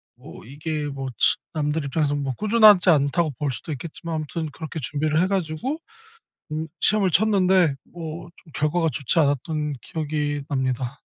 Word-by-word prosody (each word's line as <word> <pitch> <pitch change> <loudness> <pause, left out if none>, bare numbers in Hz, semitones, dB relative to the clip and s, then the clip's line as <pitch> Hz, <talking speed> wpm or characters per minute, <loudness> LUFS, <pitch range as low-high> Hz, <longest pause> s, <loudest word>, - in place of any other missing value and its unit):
뭐 - - -12
이게 150 +3 -4
뭐 135 -2 -4
측 - - +4 0.2
남들 150 -1 -1
입장에서 145 +1 0
뭐 140 -2 -2
'꾸준하지 215 -4 +6
않다.'고 155 +1 +3
볼 145 -2 -1
수도 130 +6 -6
있겠지만 165 +3 -6
아무튼 155 +1 -3
그렇게 160 0 -6
준비를 155 +4 0
해 185 - +2
가지고 195 - -2 0.8
음 155 +1 -3
시험을 200 -3 +3
쳤는데 185 -5 +4 0.2
뭐 170 0 -7
좀 160 - -19
결과가 160 +3 +1
좋지 140 +4 0
않았던 150 +1 0
기억이 150 -2 -2
납니다. 130 -2 -2
155 Hz, 335 characters per minute, -24 LUFS, 145-170 Hz, 0.8 s, 꾸준하지